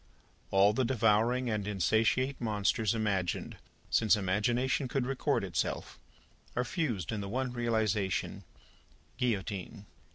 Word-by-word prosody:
All 100 +2 +5
the 130 - +1
devouring 120 +1 +2
and 105 -3 -1
insatiate 110 +7 +1
Monsters 110 -1 +1
imagined 100 -5 -1 0.3
since 110 -2 +4
imagination 120 +8 0
could 125 0 -1
record 135 0 0
itself, - - -3 0.6
are 125 - +1
fused 120 - -2
in 110 -2 -2
the 100 - -5
one 130 +3 -1
realisation, 110 -5 -1 0.7
Guillotine. 105 -4 -2
110 Hz, 110 wpm, -31 LUFS, 100-125 Hz, 0.7 s, All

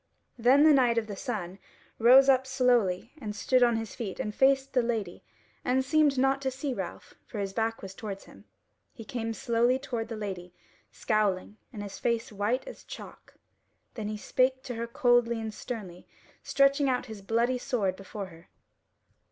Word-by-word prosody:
Then 260 +5 +5
the 310 -1 +7
Knight 245 -4 +3
of 230 - +1
the 210 -2 -6
Sun 195 -5 -5 0.4
rose 255 +4 +7
up 265 -1 +4
slowly 245 -6 +1
and 210 -3 -5
stood 255 +4 +2
on 240 -1 +4
his 225 -1 -4
feet 205 -6 -6
and 210 - -3
faced 270 +2 +3
the 255 - +4
Lady 225 -7 -3 0.4
and 260 +1 +1
seemed 295 -1 +3
not 270 +1 +2
to 265 - 0
see 265 +1 -3
Ralph, - - -7
for 225 - -8
his 195 -1 -3
back 225 0 -1
was 190 0 -7
towards 195 -1 -7
him. - - -17 0.5
He 225 -4 -9
came 225 -1 -3
slowly 235 +2 +1
toward 250 -4 -4
the 225 - -5
Lady, 185 -4 -6 0.4
scowling, 210 -2 0
and 210 -3 -6
his 200 - -8
face 235 0 -1
white 215 - -1
as - - -10
chalk; - - -11 0.6
then 220 -4 -5
he 215 0 -3
spake 260 +4 +1
to 255 -3 -5
her 230 0 -4
coldly 235 -1 +2
and 220 -1 -5
sternly, 205 -8 -7 0.3
stretching 275 0 +3
out 250 -1 0
his 220 -4 -9
bloody 235 +5 +1
sword 220 -9 -1
before 195 +1 -7
her. 165 0 -17
235 Hz, 180 wpm, -28 LUFS, 210-260 Hz, 0.6 s, the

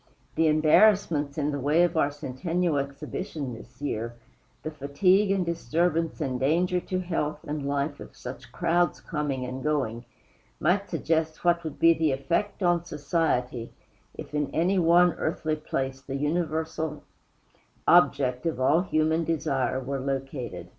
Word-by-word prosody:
The 160 - +2
embarrassments 155 -1 +4
in 150 -1 0
the 145 - -3
way 150 +6 +3
of 175 - +1
our 145 -3 +3
Centennial 150 +3 -1
Exhibition 140 +1 -5
this 120 +2 -13
year, 120 -3 -3 0.5
the 155 - -4
fatigue 180 +8 +2
and 195 -2 +1
disturbance 165 +1 0
and 130 -2 -2
danger 175 +7 +2
to 185 +1 -3
health 155 -4 -2
and 145 -1 -4
life 140 +1 -1
of - - -11
such - - -9
crowds 175 +1 +1
coming 145 -5 -3
and 130 +1 -5
going, 125 -6 -1 0.5
might 190 +5 +1
suggest 160 -1 -1
what 170 0 +3
would 160 -3 -6
be 165 0 +6
the 160 -3 +1
effect 170 +9 -1
on 175 -1 +4
human 170 - -18
society 140 -7 -1 0.4
if - - -9
in 150 -1 0
any 185 +4 +2
one 175 0 +5
earthly 155 -1 -1
place 135 -3 -3
the 135 0 -6
universal 160 0 -2 0.8
object 140 -4 +4
of 155 -6 -2
all 145 +6 +4
human 160 -2 +1
desire 140 -5 0
were 135 +1 -3
located. 135 -1 -4
155 Hz, 150 wpm, -27 LUFS, 140-170 Hz, 0.8 s, be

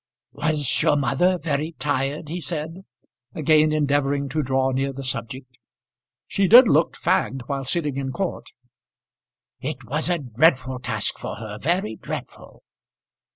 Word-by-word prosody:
"Was 150 -3 0
your 145 - +3
mother 160 +7 +2
very 155 -1 -2
tired?" 145 0 -2
he 175 +4 -5
said, 165 +4 -5 0.5
again 155 0 +4
endeavouring 140 -2 +1
to 155 +4 0
draw 130 -1 +1
near 135 +1 -1
the 135 0 -7
subject. 125 0 -6 0.7
"She 195 -1 0
did 240 +5 +9
looked 155 -1 +3
fagged 135 -2 0
while 135 0 -3
sitting 150 -1 -1
in 135 -1 -3
court." 190 +5 -4 1.1
"It - - -5
was 150 +5 -2
a 175 - +2
dreadful 130 -1 +1
task - - -1
for - - -5
her, 105 -1 -8
very 150 - -1
dreadful." - - -8
145 Hz, 140 wpm, -23 LUFS, 130-160 Hz, 1.1 s, did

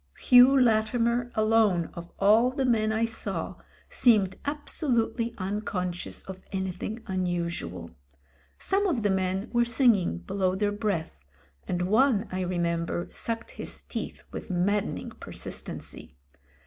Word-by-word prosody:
Hugh 255 +2 +7
Latimer 235 +1 +2
alone 215 -6 +3
of 170 0 -9
all 215 +5 +5
the 265 +1 -1
men 220 -3 +2
I 220 +1 +1
saw 225 0 -3 0.3
seemed 205 -6 +3
absolutely 250 -5 -1
unconscious 185 -2 -3
of 190 -1 -8
anything 190 +4 -4
unusual. 175 - -3 0.7
Some 395 +1 +1
of 270 - 0
the 205 - +2
men 190 +2 -1
were 240 0 +4
singing 235 - +3
be 85 - -8
low 190 -2 +1
their 205 +1 0
breath, 200 - -2 0.5
and 180 0 -1
one 220 +2 +3
I 185 0 -2
remember 170 -1 -1
sucked 230 0 -4
his - - -7
teeth - - -6
with - - -7
maddening 195 +3 -1
persistency. - - -8
210 Hz, 125 wpm, -27 LUFS, 185-235 Hz, 0.7 s, Hugh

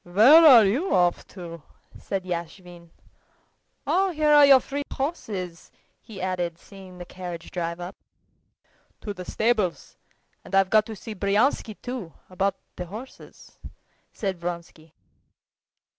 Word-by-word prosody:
"Where 225 - +7
are 240 -7 +9
you 265 - 0
off 175 -1 +1
to?" 170 -3 -10 0.3
asked 195 -2 -5
Yashvin. 175 0 -7 1.0
"Oh, 385 +1 +2
here 305 -3 +2
are 290 -1 +8
your 270 -1 +8
three 280 +3 -5
horses," 200 - -5 0.3
he 215 -4 -11
added, 180 -2 -3
seeing 190 0 -14
the 175 - -8
carriage 175 -2 -8
drive 170 -1 -4
up. 175 +2 -7 1.1
"To 205 - -5
the 180 -2 -9
stables, 215 -6 -1 0.5
and - - -5
I've 195 -1 +3
got 215 0 +4
to 220 - -7
see 220 +2 -8
Bryansky, 210 +3 0
too, 245 -10 -6 0.2
about 195 +1 0 0.2
the 180 - -5
horses," 225 +9 -12 0.5
said 190 -4 -4
Vronsky. 170 -2 -7
195 Hz, 130 wpm, -25 LUFS, 175-225 Hz, 1.1 s, are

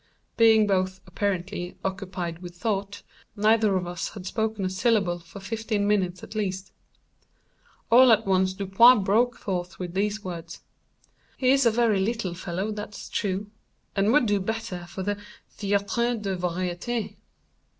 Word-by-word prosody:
Being 225 -2 +6
both, 185 -1 0
apparently, 185 -1 -3
occupied 185 -3 -4
with 175 -1 -9
thought, 200 +1 -3 0.3
neither 215 -1 +3
of 180 - -2
us 175 -1 -4
had 190 -3 -8
spoken 220 0 -2
a - - 0
syllable 190 -3 +1
for 175 +4 -12
fifteen 215 0 -2
minutes 185 -3 0
at - - -9
least. 190 -3 -3 1.2
All 250 +1 +8
at 220 - +4
once 190 -1 +2
Dupin 200 +4 +5
broke 235 +5 +2
forth 180 -2 -4
with 180 -2 -5
these 205 +2 -1
words: 170 -2 -7 0.8
"He 255 -1 +3
is 270 -2 +4
a - - +7
very 220 -3 +2
little 200 -2 -1
fellow, 185 +3 -3
that's 210 -1 -7
true, 200 +1 -2 0.4
and 200 +2 +3
would 295 -1 +4
do 205 -2 +2
better 195 -3 -4
for 190 - -6
the 205 +1 -2 0.4
Théâtre 205 +4 0
des 195 -2 -2
Variétés." 180 +6 -3
200 Hz, 150 wpm, -26 LUFS, 185-220 Hz, 1.2 s, All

